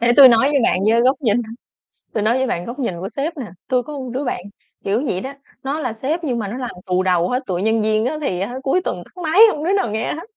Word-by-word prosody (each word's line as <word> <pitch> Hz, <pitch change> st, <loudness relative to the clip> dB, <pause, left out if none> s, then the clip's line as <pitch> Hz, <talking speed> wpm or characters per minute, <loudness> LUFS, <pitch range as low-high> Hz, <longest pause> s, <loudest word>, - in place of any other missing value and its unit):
để 240 Hz, +1 st, +3 dB
tui 270 Hz, -2 st, +11 dB
nói 235 Hz, +3 st, +4 dB
với 285 Hz, -2 st, +2 dB
bạn, -, -, +2 dB
với 230 Hz, -, +4 dB
góc 260 Hz, +3 st, +2 dB
nhìn 220 Hz, -5 st, +2 dB, 0.8 s
tui 215 Hz, -, 0 dB
nói 235 Hz, +4 st, +2 dB
với 265 Hz, -, 0 dB
bạn 175 Hz, -7 st, -2 dB
góc 245 Hz, +4 st, -7 dB
nhìn 190 Hz, -9 st, -2 dB
của 190 Hz, +3 st, -5 dB
sếp 295 Hz, +8 st, -4 dB
nè. 255 Hz, -, -4 dB, 0.2 s
Tui 250 Hz, -1 st, +1 dB
có 300 Hz, -, -8 dB
một 255 Hz, -2 st, -6 dB
đứa 270 Hz, +3 st, -2 dB
bạn 245 Hz, -, -2 dB, 0.4 s
kiểu 215 Hz, +7 st, 0 dB
vậy 185 Hz, -8 st, -2 dB
đó, 265 Hz, +5 st, -6 dB, 0.3 s
nó 280 Hz, +4 st, -2 dB
là 250 Hz, -6 st, -2 dB
sếp 300 Hz, +9 st, -3 dB
nhưng 250 Hz, -5 st, -1 dB
mà 210 Hz, -, -3 dB
nó 220 Hz, +5 st, -5 dB
làm 250 Hz, -2 st, -4 dB, 0.2 s
xù 185 Hz, 0 st, +1 dB
đầu 180 Hz, -1 st, +2 dB
hết, 255 Hz, +2 st, -1 dB
tụi 180 Hz, -2 st, -2 dB
nhân 220 Hz, +1 st, +2 dB
viên 215 Hz, +1 st, +1 dB
á, 305 Hz, +5 st, -1 dB
thì 185 Hz, -11 st, -2 dB
á, 200 Hz, +6 st, -3 dB
cuối 275 Hz, +7 st, +2 dB
tuần 175 Hz, -, -4 dB
tắt 360 Hz, -, -13 dB
máy, 320 Hz, +5 st, +2 dB
hông 295 Hz, -, -5 dB
đứa 370 Hz, +4 st, +1 dB
nào 390 Hz, -, +1 dB
nghe 220 Hz, +1 st, -2 dB
hết. 320 Hz, -, -7 dB
245 Hz, 290 wpm, -20 LUFS, 215-280 Hz, 0.8 s, tui